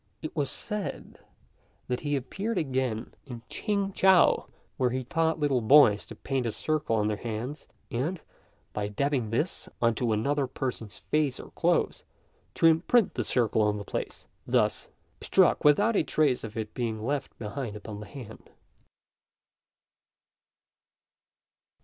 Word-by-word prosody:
It 155 - -5
was 145 -4 0
said 210 -2 -5 0.7
that 125 0 -1
he 145 -1 -1
appeared 195 - -3
again 130 -6 -1
in 120 -3 -8
Ch'ing 200 -2 -1
chou, 190 -2 +5 0.3
where 125 - +2
he 130 +1 -2
taught 160 +4 0
little 140 -4 +2
boys 115 -3 +6
to - - -9
paint 135 -3 -2
a - - -1
circle 150 -2 -1
on 105 -1 +1
their 105 -1 -1
hands, 120 +6 -5 0.2
and, 155 +10 -1 0.5
by 105 -1 -2
dabbing 125 +2 -1
this 150 +10 -2
on 115 -1 +3
to 115 +1 -1
another 140 +6 +1
person's 125 -5 -5
face 150 -4 0
or - - -10
clothes, - - +1 0.5
to - - +2
imprint 170 +8 +4
the - - -1
circle 115 -3 +1
on 105 0 +2
the 100 - -5
place - - -5 0.2
thus - - +1 0.3
struck - - +3
without 205 +10 +4
a - - +4
trace 145 -3 +1
of 110 0 -7
it 110 -1 -4
being 110 -3 -3
left 140 +1 -2
behind 115 0 -5
upon 105 0 -7
the 105 - -9
hand. 110 -1 -11
130 Hz, 145 wpm, -28 LUFS, 110-150 Hz, 0.7 s, boys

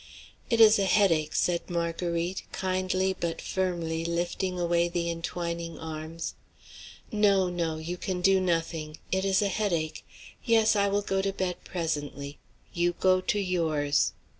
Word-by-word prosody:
"It 230 -3 +2
is 220 -1 +8
a 195 - +2
headache," 170 -7 +3
said 175 0 0
Marguerite, 170 +1 -1
kindly 185 0 0
but 170 -1 -2
firmly 170 -3 -2
lifting 175 +2 -2
away 170 0 +2
the 170 -1 -1
intwining 170 0 -4
arms. 160 +1 -5 0.8
"No, 200 -4 +3
no, 165 -2 -1
you 165 +3 -5
can 185 0 -3
do 190 +1 +4
nothing. 165 -3 -1
It 190 +1 +1
is 195 +1 +3
a - - +2
headache. 175 -6 -1 0.4
Yes, 225 -2 +4
I 200 -1 +3
will 200 +1 0
go 195 -1 0
to 195 0 0
bed 185 -2 -3
presently; 145 -4 -4 0.3
you 175 0 +1
go 185 +1 +3
to 205 - 0
yours. 160 -6 +1
175 Hz, 145 wpm, -28 LUFS, 165-190 Hz, 0.8 s, is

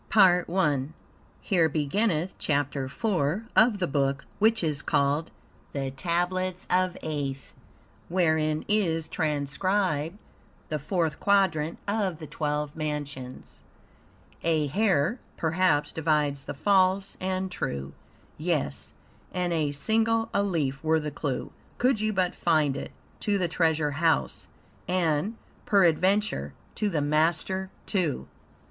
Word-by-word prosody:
PART 180 -4 +5
1 150 -5 0 0.5
Here 170 -5 +2
beginneth 165 +4 0
Chapter 140 -2 0
4 195 - -1
of 220 -1 +5
the 185 - 0
Book 140 -1 0
which 220 -1 +3
is 155 -2 0
called 145 +2 +1 0.4
"The 135 -2 -2
Tablets 180 +5 -1
of 185 0 +2
Aeth," 140 -3 -4 0.6
wherein 160 -3 +1
is 170 -7 +1
transcribed 160 +3 0 0.5
the 155 - -1
Fourth 160 0 -1
Quadrant 170 -6 +2
of 200 -5 0
the 160 - -8
Twelve 150 -1 -2
Mansions. 145 -4 -5 0.8
"A 160 -2 +2
hair, 190 - +1 0.2
perhaps, 160 -2 +2
divides 150 -3 0
the - - -5
false 195 +3 +2
and 185 0 -2
true. 70 - -4 0.5
Yes, 150 - -2 0.4
and 180 -1 -1
a 155 -3 +1
single 225 +8 +1
alif 160 -9 0
were 160 0 +3
the 150 -1 -4
clue 140 -2 -3 0.3
Could 250 -3 +2
you 215 0 +1
but 185 -3 +1
find 155 -5 +2
it - - -6 0.3
to 205 -2 +1
the 180 -3 +1
treasure 160 -3 +1
house, 140 - 0 0.4
And, 180 +3 +1 0.3
peradventure, 195 +2 +2 0.2
to 210 - 0
THE 160 -6 0
MASTER, 160 +6 +1 0.2
too. 175 - -1
165 Hz, 120 wpm, -27 LUFS, 150-190 Hz, 0.8 s, PART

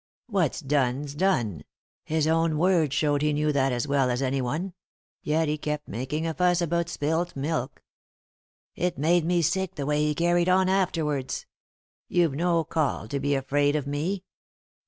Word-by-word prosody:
What's 190 - 0
done's 140 0 0
done; 120 - 0 0.4
his 155 -1 0
own 160 0 +2
words 170 -3 +3
showed 145 -2 +1
he 150 0 +2
knew 150 +1 +1
that 135 -2 +1
as 125 +3 -1
well 140 -2 +2
as 125 0 0
any 135 +1 0
one; 160 +9 -3 0.5
yet 160 +1 +1
he 150 0 -1
kept 150 0 -3
making 130 +8 -3
a 165 - -1
fuss 180 +1 +2
about 170 0 0
spilt 160 +3 -1
milk. 140 -2 -3 0.9
It 180 -3 -2
made 165 +4 +2
me 175 0 +2
sick 190 +3 0
the 140 - -3
way 150 +1 +1
he 150 0 0
carried 175 +2 +2
on 185 0 +4
afterwards. 155 -9 -1 0.6
You've 170 -5 +2
no 170 +2 +1
call 155 -8 -1
to 140 - -2
be 140 +1 +1
afraid 145 +2 +1
of 150 -3 -1
me." 160 +7 -2
150 Hz, 170 wpm, -26 LUFS, 140-170 Hz, 0.9 s, on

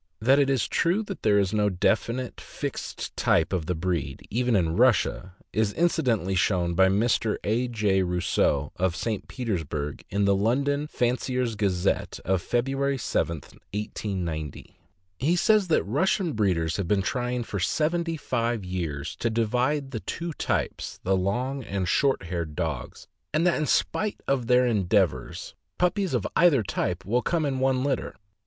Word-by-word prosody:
That 130 +6 +4
it 140 -1 +3
is 135 -3 +1
true 180 +6 +1
that 200 -2 -7
there 105 -2 +4
is 100 -1 +1
no 105 -1 +2
definite, 115 +6 0
fixed - - -5
type 85 +3 +2
of 85 -4 -1
the 90 - 0
breed, 80 -5 -3
even 120 +1 +1
in 85 -4 +1
Russia, 110 -5 +2 0.2
is 105 -2 +1
incidentally 125 - +1
shown 90 -2 +1
by 95 +2 +5
Mr. 105 +2 +1
A. 115 +4 +1
J. 105 -5 +1
Rosseau, 90 -5 +1
of 90 -1 +1
St. 110 0 -3
Petersburg, 80 - -3
in 100 +1 +1
the 100 - +4
London 140 +8 +1
Fancier's 125 -2 0
Gazette 95 -4 0
of 95 -1 +1
February 135 +5 0
7, 85 -8 -1
1890. 90 -8 -5 0.4
He 155 +7 +2
says 210 +2 +3
that 165 - +3
Russian 170 - +1
breeders 90 -7 +1
have 100 -4 -2
been 100 0 +2
trying 125 +2 -1
for 100 -3 -4
seventy 165 - 0
five 115 -6 -1
years 85 -4 -4
to 115 - 0
divide 125 +5 0
the 115 - -3
two 165 +8 -4
types, - - -2
the 95 +1 +2
long 125 +9 -1
and 100 -4 -2
short 135 - +2
haired 85 -3 -4
dogs, - - -4 0.3
and 160 +3 +2
that, 175 - +3
in 155 - 0
spite 215 +8 0
of 130 -4 0
their 125 +1 +5
endeavors, 95 - 0 0.2
puppies 180 -3 +1
of 115 - -1
either 155 -8 +5
type 90 -1 -2
will 120 +6 +1
come 165 +1 0
in 135 -2 -1
one 130 -1 +2
litter. 135 -2 -1
110 Hz, 160 wpm, -26 LUFS, 95-135 Hz, 0.4 s, by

